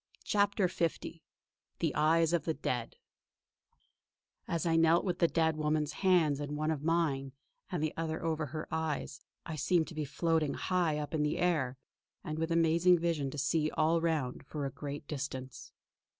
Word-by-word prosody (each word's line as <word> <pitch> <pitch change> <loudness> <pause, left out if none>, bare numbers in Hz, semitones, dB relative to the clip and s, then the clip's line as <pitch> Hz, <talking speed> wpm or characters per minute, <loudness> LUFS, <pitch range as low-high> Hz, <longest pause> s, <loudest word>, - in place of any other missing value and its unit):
CHAPTER 200 -2 +2
L 170 -2 +1 0.9
THE 160 -4 0
EYES 160 +2 +3
OF 165 -4 +1
THE 160 - 0
DEAD 125 -4 -3 1.5
As 170 -1 -1
I 165 -1 +2
knelt 165 +1 +4
with 180 -2 -1
the 170 - +5
dead 160 -1 +1
woman's 150 -1 0
hands 170 -7 +3
in 145 0 -4
one 155 +1 0
of 150 -3 -2
mine 150 -5 0 0.4
and 175 -4 -1
the 155 - -1
other 160 -1 -3
over 160 -2 -1
her 155 +3 -5
eyes, 160 -3 -3 0.2
I 160 - -5
seemed 160 +2 +2
to - - -9
be 155 -1 -2
floating 155 +1 0
high 175 -5 0
up 150 +1 -4
in 155 - +1
the 150 0 0
air; 150 -8 +1 0.5
and 155 0 -4
with 165 +1 -1
amazing 170 +2 +4
vision 165 -5 -1
to 150 - -7
see 155 +2 +1
all 160 +2 +2
round 155 -7 -1
for 145 -2 -4
a 135 - -3
great 145 +2 -6
distance. 130 -3 -6
160 Hz, 175 wpm, -32 LUFS, 150-165 Hz, 1.5 s, the